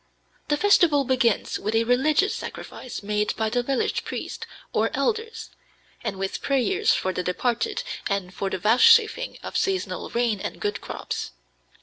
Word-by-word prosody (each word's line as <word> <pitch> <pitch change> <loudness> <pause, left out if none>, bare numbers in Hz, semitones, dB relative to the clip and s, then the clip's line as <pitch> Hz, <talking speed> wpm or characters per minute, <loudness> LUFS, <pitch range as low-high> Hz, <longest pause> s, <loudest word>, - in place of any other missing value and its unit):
The 295 - +1
festival 340 -7 +4
begins 245 -4 +1
with 215 +2 -2
a 225 - +4
religious 280 - +2
sacrifice 250 - -7
made 210 +1 0
by 220 -1 -1
the 245 +1 +1
village 265 +1 -1
priest - - -6 0.3
or - - +2
elders, 455 0 -2 0.5
and 195 - -3
with 195 0 -3
prayers 370 - +2
for 185 - -1
the 180 - -1
departed 225 +6 -1 0.3
and 195 -2 -2
for 195 - -2
the - - -2
vouchsafing 455 - +4
of - - -7
seasonable 385 -1 -1
rain 235 -3 0
and - - -5
good 205 - -2
crops. - - -5
245 Hz, 150 wpm, -25 LUFS, 210-345 Hz, 0.5 s, festival